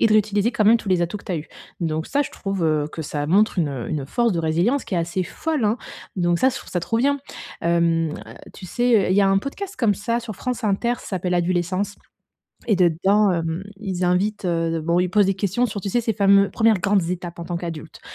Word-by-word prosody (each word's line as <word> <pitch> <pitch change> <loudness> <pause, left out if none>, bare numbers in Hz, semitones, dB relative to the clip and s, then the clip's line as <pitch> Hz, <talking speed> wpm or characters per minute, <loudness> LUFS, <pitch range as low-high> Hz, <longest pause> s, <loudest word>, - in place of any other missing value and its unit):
et - - +5
de 215 - +2
réutiliser 215 +2 +2
quand 215 - +1
même 220 +3 +7
tous 220 - -7
les 180 -2 +2
atouts 170 +5 -2
que - - -18
tu - - -4
as 170 - 0
eus. 150 - -9 0.3
Donc 160 -1 -1
ça, 285 +1 +1
je - - -7
trouve, 195 -3 -3
heu, 155 -2 +1
que 160 - -5
ça 145 0 -3
montre 200 +4 +3
une, 155 -4 +2
heu, 130 -4 -5
une 140 -3 -3
force 235 - +1
de 170 - -1
résilience 170 - +1
qui - - -4
est 175 - +2
assez 170 +2 -1
folle, 315 - -2
hein. 210 +2 +2 0.4
Donc 175 -1 +1
ça, 260 - +4
je - - -3
trouve - - -9
ça 175 - -1
trop 225 +6 -1
bien, 280 +3 +2 0.4
hem, 170 -1 +2
heu, - - -5 0.4
tu 185 - -10
sais, 240 0 +2
heu, - - 0
il 190 - +3
y - - +5
a 195 - +4
un 195 - +4
podcast 385 - -6
comme 220 -5 +2
ça 230 +4 -1
sur 230 -3 -7
France 250 -1 -3
Inter, 215 +4 +1
ça - - -12
s'appelle 180 -2 -1
«Adulescence», 185 +3 0 0.7
et 210 - +3
dedans, 190 +4 +3
hem, 165 +1 -2
ils 185 -2 -3
invitent, 195 +4 0
heu, 165 -2 0
de 165 - -1
bon 170 +2 +1
ils 180 - +1
posent 205 +2 +4
des 195 - +2
questions 200 +5 0
sur, 205 -2 -5
tu 200 - -4
sais, 240 +4 +1
ces 225 - 0
fameux, 200 0 +4
1ères 225 -3 +3
grandes 195 -2 +2
étapes 175 0 -5
en 170 - -5
tant 175 - -3
qu'adulte. 165 -2 -7
190 Hz, 260 wpm, -22 LUFS, 170-215 Hz, 0.7 s, même